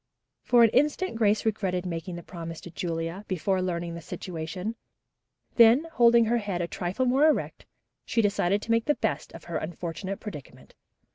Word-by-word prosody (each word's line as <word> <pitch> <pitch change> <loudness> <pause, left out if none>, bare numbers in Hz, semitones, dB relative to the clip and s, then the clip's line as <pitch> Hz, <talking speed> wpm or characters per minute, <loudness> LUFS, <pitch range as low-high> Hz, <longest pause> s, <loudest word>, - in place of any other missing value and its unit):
For 240 -1 +5
an 225 - +5
instant 300 +6 +1
Grace 215 -1 +2
regretted 190 -4 -1
making 170 +1 -4
the 170 - -8
promise 165 -2 -7
to 175 - -10
Julia, 165 +2 -4
before 185 +1 0
learning 170 -2 -2
the 170 - -7
situation; 175 +5 -5 0.8
then, 235 +6 +7
holding 235 -3 +5
her 235 +2 +1
head 200 -5 -3
a 170 - -1
trifle 185 +9 -2
more 270 +5 +4
erect, 310 - -1 0.4
she 230 - 0
decided 200 0 +1
to 230 - -3
make 230 0 +2
the 295 - +2
best - - -2
of - - -10
her 170 -2 -4
unfortunate 175 +4 -5
predicament. 175 -11 -10
190 Hz, 170 wpm, -27 LUFS, 170-230 Hz, 0.8 s, then